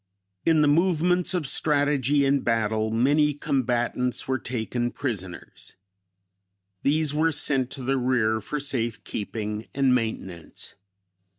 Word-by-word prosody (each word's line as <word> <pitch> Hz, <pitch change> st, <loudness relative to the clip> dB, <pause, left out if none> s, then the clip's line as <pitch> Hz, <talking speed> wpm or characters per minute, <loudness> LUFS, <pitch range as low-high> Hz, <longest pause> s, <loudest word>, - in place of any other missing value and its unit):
In 160 Hz, -2 st, +4 dB
the 150 Hz, -, +4 dB
movements 180 Hz, +3 st, +2 dB
of 175 Hz, -4 st, -1 dB
strategy 145 Hz, -1 st, +2 dB
and 140 Hz, 0 st, +2 dB
battle, 110 Hz, -1 st, 0 dB
many 145 Hz, +6 st, +2 dB
combatants 125 Hz, -4 st, -1 dB
were 130 Hz, 0 st, 0 dB
taken 120 Hz, 0 st, -3 dB
prisoners; 100 Hz, -11 st, -6 dB, 1.1 s
these 150 Hz, +1 st, +1 dB
were 160 Hz, +2 st, +2 dB
sent 135 Hz, -3 st, +1 dB
to 135 Hz, -, -6 dB
the 135 Hz, +1 st, 0 dB
rear 120 Hz, -3 st, +1 dB
for 150 Hz, -, -4 dB
safe 120 Hz, -6 st, -3 dB
keeping 105 Hz, +1 st, -5 dB
and 135 Hz, -2 st, +3 dB
maintenance. 105 Hz, -8 st, -4 dB
130 Hz, 120 wpm, -25 LUFS, 115-145 Hz, 1.1 s, In